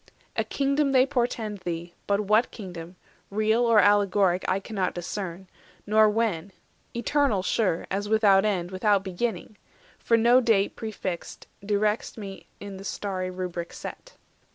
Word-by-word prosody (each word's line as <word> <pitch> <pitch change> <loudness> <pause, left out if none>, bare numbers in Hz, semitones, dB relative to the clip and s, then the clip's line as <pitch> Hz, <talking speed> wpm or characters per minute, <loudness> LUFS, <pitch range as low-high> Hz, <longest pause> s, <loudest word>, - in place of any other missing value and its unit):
A - - +1
kingdom 275 0 0
they 260 -1 +6
portend 235 -6 -2
thee, 175 -1 -5
but 200 0 +2
what 215 +3 +3
kingdom, 180 -4 -9 0.3
Real 215 +3 +2
or 230 -2 +4
allegoric, 200 -2 +3
I 185 - +2
discern 195 - -9
not; 185 -2 0
390 180 +1 -5 0.4
Nor 215 +1 +5
when: 205 -5 -1 0.4
eternal 240 -5 +1
sure—as 195 0 -1
without 205 -3 +5
end, 185 -4 -1
Without 195 +1 +2
beginning; 210 +3 -3 0.4
for 230 - +2
no 240 +3 +5
date 215 -5 +2
prefixed 195 -5 -5 0.2
Directs 210 +2 0
me 195 -3 -8
in 200 -1 -8
the 195 - -9
starry 190 -2 -3
rubric 180 -2 -5
set." - - -9
205 Hz, 140 wpm, -26 LUFS, 185-225 Hz, 0.4 s, they